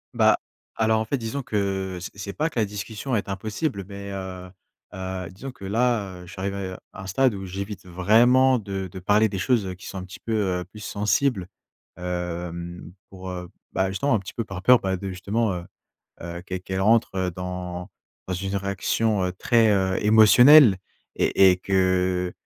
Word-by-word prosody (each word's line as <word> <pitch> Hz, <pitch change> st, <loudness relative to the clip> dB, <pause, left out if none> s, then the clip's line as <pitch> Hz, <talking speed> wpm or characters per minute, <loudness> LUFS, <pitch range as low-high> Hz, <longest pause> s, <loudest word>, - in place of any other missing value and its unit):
Bah, -, -, +5 dB, 0.4 s
alors, 110 Hz, 0 st, +2 dB
en 110 Hz, -, -1 dB
fait, 140 Hz, -, -1 dB
disons 115 Hz, +4 st, -4 dB
que 95 Hz, -3 st, -2 dB
c 90 Hz, -, -5 dB
c'est 100 Hz, 0 st, -6 dB
pas 155 Hz, +2 st, 0 dB
que 120 Hz, -, -3 dB
la 110 Hz, -, +3 dB
discussion 105 Hz, +5 st, -4 dB
est 100 Hz, -, -2 dB
impossible, 105 Hz, -, -3 dB
mais, 100 Hz, 0 st, -8 dB
heu, 95 Hz, -1 st, -6 dB, 0.4 s
heu, 95 Hz, -1 st, -5 dB
disons 105 Hz, +10 st, -8 dB
que 125 Hz, -6 st, -11 dB
là, 105 Hz, -4 st, 0 dB
heu, -, -, -12 dB
j'arrive 95 Hz, +3 st, -4 dB
à, 100 Hz, -, -4 dB
heu, 95 Hz, -1 st, -5 dB, 0.2 s
un 95 Hz, 0 st, -8 dB
stade 125 Hz, +4 st, +2 dB
où 95 Hz, -1 st, -6 dB
j'évite 100 Hz, +1 st, -6 dB
vraiment 120 Hz, +9 st, +4 dB
de 95 Hz, -3 st, -4 dB
de 95 Hz, -, -7 dB
parler 105 Hz, +4 st, +3 dB
des 95 Hz, -, -4 dB
choses, 110 Hz, 0 st, +1 dB
heu, 90 Hz, -, -5 dB
qui 90 Hz, -, -13 dB
sont 95 Hz, -, -6 dB
un 90 Hz, -, -6 dB
petit 95 Hz, -, -11 dB
peu, 115 Hz, -, -6 dB, 0.3 s
heu, -, -, -7 dB
plus 105 Hz, -, -14 dB
sensibles. 105 Hz, 0 st, 0 dB, 0.5 s
Hem, 90 Hz, -1 st, -5 dB, 0.2 s
pour, 95 Hz, -1 st, -8 dB
heu 90 Hz, -1 st, -6 dB, 0.2 s
bah, 95 Hz, 0 st, 0 dB
justement, 115 Hz, +7 st, +1 dB
un -, -, +1 dB
petit 95 Hz, -, -9 dB
peu 115 Hz, -, -2 dB
par 95 Hz, -1 st, -7 dB
peur, 125 Hz, +2 st, +7 dB
bah, 95 Hz, -1 st, -1 dB
de 95 Hz, +1 st, -5 dB
justement, 100 Hz, +3 st, -1 dB
heu, 90 Hz, -1 st, -5 dB, 0.6 s
heu, 85 Hz, 0 st, -6 dB
qu'elle 90 Hz, 0 st, -5 dB
qu'elle 95 Hz, +1 st, -3 dB
rentre, 110 Hz, 0 st, +3 dB
heu, 95 Hz, -1 st, 0 dB
dans 90 Hz, +1 st, -6 dB, 0.4 s
dans 95 Hz, -, -2 dB
une 95 Hz, +2 st, -3 dB
réaction, 100 Hz, +1 st, 0 dB
heu, 90 Hz, -, -1 dB
très, 115 Hz, +3 st, +3 dB
heu, 95 Hz, -1 st, +1 dB
émotionnelle 110 Hz, +2 st, +8 dB, 0.4 s
et 95 Hz, -, +5 dB
et 90 Hz, -, 0 dB
que 95 Hz, -1 st, +1 dB
95 Hz, 195 wpm, -24 LUFS, 90-110 Hz, 0.6 s, émotionnelle